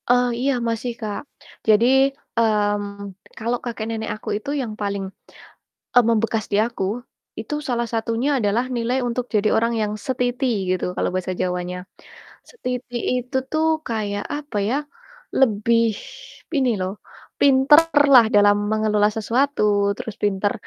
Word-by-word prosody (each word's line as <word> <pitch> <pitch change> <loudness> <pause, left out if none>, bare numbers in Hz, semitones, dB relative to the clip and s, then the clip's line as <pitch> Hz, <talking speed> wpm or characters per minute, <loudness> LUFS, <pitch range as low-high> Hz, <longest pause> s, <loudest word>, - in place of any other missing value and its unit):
Eh, 245 0 +4
iya 275 +2 +2 0.2
masih, 230 +2 -2
Kak. 210 -2 -3 0.5
Jadi, 220 +1 +5 0.5
mmm, 205 -2 0 0.2
kalau 235 +2 -1
kakek-nenek 225 -2 -4
aku 215 - -8
itu 215 - -7
yang 230 -4 -4
paling, 200 -1 -2 0.9
e - - +11
membekas 225 -1 +1
di - - +3
aku. 225 -3 -1 0.6
Itu, - - -5
salah 235 -2 -1
satunya 230 +3 -1
adalah 220 +2 +1
nilai 240 +2 0
untuk 245 0 -1
jadi 210 0 +3
orang 230 +1 +2
yang 210 0 -1
setiti 250 +1 -1 0.2
gitu 185 -1 0
kalau - - 0
bahasa 185 0 -2
Jawanya. 180 0 -2 0.7
Setiti 250 - -5 0.2
itu 250 +2 -6
tuh 315 0 +1 0.2
kayak, 205 -3 -2
apa 290 -6 -7
ya, 250 - +1 0.6
lebih 230 -1 +3 0.7
ini 265 -2 +2
loh, 185 +1 -2 0.5
pinterlah 285 -1 +6
dalam 205 0 +6
mengelola 215 -1 +2
sesuatu, 240 +6 0 0.3
terus 240 -4 -6
pinter 205 0 +1
230 Hz, 130 wpm, -22 LUFS, 205-250 Hz, 0.9 s, e